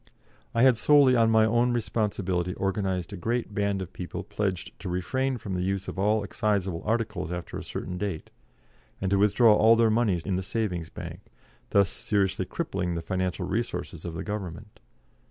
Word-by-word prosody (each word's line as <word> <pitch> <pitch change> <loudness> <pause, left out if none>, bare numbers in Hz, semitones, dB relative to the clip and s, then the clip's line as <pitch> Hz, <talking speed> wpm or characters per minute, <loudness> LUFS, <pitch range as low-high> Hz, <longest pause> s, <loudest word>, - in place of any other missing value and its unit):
I 115 - +4
had 130 -3 +6
solely 140 -1 +5
on 115 -1 +4
my 110 -1 +5
own 120 +2 +2
responsibility 95 -6 -1
organised 95 -2 -1
a - - -3
great 115 +4 -2
band 100 -1 0
of 90 - -11
people 90 - -5
pledged 95 -4 -3
to 95 - -5
refrain 130 +9 -1
from 100 -4 -6
the 90 - -1
use 95 +1 -1
of - - -5
all 105 +2 +2
excisable 100 -4 -1
articles 105 -6 -1
after 90 -1 -5
a - - -5
certain 90 0 -5
date, 95 -6 -4 0.7
and 95 0 -1
to 100 - +3
withdraw 105 +2 +5
all 110 +2 +6
their 115 -1 +4
moneys 105 -7 +1
in 95 -3 -1
the - - -1
Savings 95 -4 -2
Bank, - - -8 0.5
thus 100 -1 +4
seriously 100 -3 0
crippling 90 -1 -2
the 85 - -4
financial 95 0 -2
resources 95 -4 -3
of 85 -2 -5
the - - -4
Government. 105 0 -6
100 Hz, 180 wpm, -27 LUFS, 90-110 Hz, 0.7 s, had